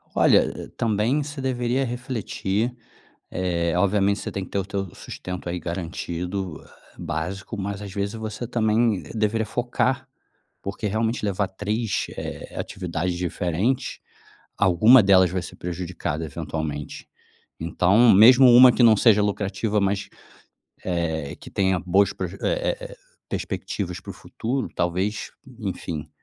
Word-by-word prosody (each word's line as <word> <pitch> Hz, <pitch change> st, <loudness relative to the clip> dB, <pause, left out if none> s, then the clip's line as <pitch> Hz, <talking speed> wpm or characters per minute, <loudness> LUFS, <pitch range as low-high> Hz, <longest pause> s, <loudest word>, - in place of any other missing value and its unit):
Olha, -, -, +3 dB
também 115 Hz, +6 st, +1 dB
você 145 Hz, 0 st, -7 dB
deveria 130 Hz, 0 st, 0 dB
refletir, 120 Hz, -2 st, -2 dB, 0.6 s
eh, 85 Hz, -3 st, -1 dB
obviamente 100 Hz, +1 st, +2 dB
você -, -, -5 dB
tem 100 Hz, -, -4 dB
que -, -, -14 dB
ter -, -, -1 dB
o 95 Hz, -, -1 dB
teu 95 Hz, -2 st, -4 dB
sustento 90 Hz, -1 st, -7 dB
aí 90 Hz, +1 st, -2 dB
garantido 90 Hz, +1 st, -4 dB, 0.4 s
básico, 90 Hz, +7 st, -4 dB
mas 100 Hz, 0 st, -3 dB
às 100 Hz, -2 st, -7 dB
vezes 100 Hz, +1 st, -2 dB
você 110 Hz, +1 st, -5 dB
também 110 Hz, -3 st, +1 dB
deveria 110 Hz, 0 st, 0 dB
focar, 130 Hz, +3 st, -1 dB, 0.6 s
porque 100 Hz, +2 st, -4 dB
realmente 110 Hz, +3 st, -1 dB
levar 100 Hz, -1 st, 0 dB
três, 105 Hz, +3 st, -2 dB
eh, -, -, -7 dB
atividades 90 Hz, 0 st, -3 dB
diferentes, 90 Hz, +8 st, -1 dB, 0.6 s
alguma 105 Hz, +6 st, +6 dB
delas 95 Hz, -2 st, +5 dB
vai 95 Hz, 0 st, -1 dB
ser -, -, -9 dB
prejudicada 85 Hz, -3 st, -4 dB
eventualmente. 75 Hz, -1 st, -5 dB, 0.5 s
Então, 95 Hz, +8 st, +4 dB
mesmo 125 Hz, +6 st, +8 dB
uma 125 Hz, +1 st, +9 dB
que 120 Hz, -, +2 dB
não 115 Hz, -2 st, +7 dB
seja 105 Hz, -1 st, +5 dB
lucrativa, 105 Hz, +1 st, 0 dB
mas 100 Hz, 0 st, -1 dB, 0.7 s
é 80 Hz, -5 st, -2 dB
que -, -, -12 dB
tenha 95 Hz, -2 st, +1 dB
boas 95 Hz, +3 st, +3 dB
pro 95 Hz, -, -3 dB
eh, 95 Hz, +3 st, -10 dB, 0.4 s
eh, -, -, -8 dB, 0.3 s
perspectivas -, -, -4 dB
para -, -, -11 dB
o -, -, -11 dB
futuro, 130 Hz, +4 st, -3 dB
talvez, 95 Hz, +4 st, -1 dB, 0.3 s
enfim, 85 Hz, -7 st, -5 dB
100 Hz, 135 wpm, -24 LUFS, 90-115 Hz, 0.7 s, uma